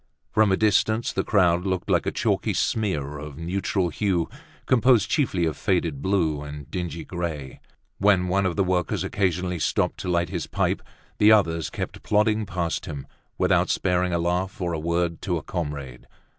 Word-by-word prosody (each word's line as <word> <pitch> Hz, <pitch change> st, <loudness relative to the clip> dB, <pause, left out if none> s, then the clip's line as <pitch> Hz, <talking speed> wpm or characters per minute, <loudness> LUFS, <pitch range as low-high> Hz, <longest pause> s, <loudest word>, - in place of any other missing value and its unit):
From 110 Hz, -2 st, +4 dB
a 95 Hz, -, +3 dB
distance 110 Hz, +2 st, +2 dB
the -, -, 0 dB
crowd 90 Hz, -4 st, +3 dB
looked 95 Hz, -2 st, -2 dB
like -, -, +2 dB
a -, -, +1 dB
chalky -, -, 0 dB
smear 75 Hz, -10 st, -1 dB
of 75 Hz, -1 st, -8 dB
neutral 90 Hz, +2 st, -1 dB
hue 90 Hz, 0 st, 0 dB, 0.4 s
composed 125 Hz, -4 st, +4 dB
chiefly 105 Hz, -, +1 dB
of 80 Hz, -, -1 dB
faded 85 Hz, -7 st, 0 dB
blue 85 Hz, -6 st, +1 dB
and 75 Hz, -1 st, -8 dB
dingy 85 Hz, -3 st, -4 dB
gray. 80 Hz, -6 st, -5 dB, 0.4 s
When 95 Hz, -2 st, +4 dB
one 95 Hz, +1 st, +2 dB
of 85 Hz, -, -2 dB
the 100 Hz, -, +2 dB
workers 90 Hz, -2 st, 0 dB
occasionally 90 Hz, -2 st, -1 dB
stopped -, -, 0 dB
to -, -, -4 dB
light 85 Hz, -1 st, +1 dB
his -, -, -3 dB
pipe -, -, 0 dB, 0.4 s
the 105 Hz, +1 st, +7 dB
others 85 Hz, -6 st, +3 dB
kept -, -, -5 dB
plodding 105 Hz, 0 st, +2 dB
past 85 Hz, -2 st, -2 dB
him, 70 Hz, -2 st, -6 dB, 0.3 s
without -, -, +2 dB
sparing 90 Hz, -1 st, +1 dB
a 85 Hz, -, +1 dB
laugh 90 Hz, +3 st, -1 dB
or 90 Hz, -2 st, -1 dB
a 80 Hz, -, -2 dB
word 85 Hz, +1 st, -1 dB
to 90 Hz, -3 st, -1 dB
a 80 Hz, -, -6 dB
comrade. 70 Hz, -7 st, -5 dB
90 Hz, 175 wpm, -25 LUFS, 80-100 Hz, 0.4 s, the